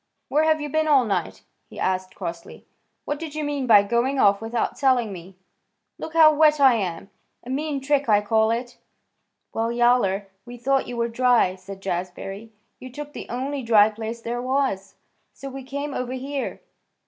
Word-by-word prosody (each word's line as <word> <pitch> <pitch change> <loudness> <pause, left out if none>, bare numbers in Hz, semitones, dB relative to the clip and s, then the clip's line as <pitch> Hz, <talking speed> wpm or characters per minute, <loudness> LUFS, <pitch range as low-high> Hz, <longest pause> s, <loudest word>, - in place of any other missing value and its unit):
"Where 305 +2 +2
have 315 0 +3
you 295 - -4
been 310 +2 0
all 275 -5 +4
night?" 190 -6 -3 0.3
he - - -13
asked 185 0 -2
crossly. 170 0 -7 0.4
"What 290 0 -3
did 315 -2 -7
you 310 - -2
mean 290 -3 -2
by 210 -3 +7
going 240 +6 0
off 200 -4 +4
without 225 +1 -2
telling 250 -6 +2
me? 180 +1 -11 0.6
Look 320 - -7
how 315 -1 +7
wet 305 0 +4
I 270 -3 +7
am! 195 -3 -3 0.3
A 250 - -7
mean 290 +1 -2
trick, 280 -2 0
I 205 -1 +5
call 220 +1 +2
it." 240 +2 -3 0.7
"Well, 225 +1 -1
Yowler, 235 -5 +2 0.2
we 245 +2 -10
thought 270 +3 0
you 245 - -6
were 235 0 +1
dry," 235 -5 +3
said 190 +1 -11
Jazbury. 195 +4 -5 0.3
"You 255 - -10
took 295 +3 -8
the - - -8
only 270 +3 -3
dry 220 -3 +5
place 225 +2 -6
there 240 +1 -3
was, 255 -7 -1 0.4
so 275 - -8
we 270 +1 -7
came 280 +2 -5
over 250 -1 -3
here." 270 +1 -4
245 Hz, 185 wpm, -23 LUFS, 205-275 Hz, 0.7 s, by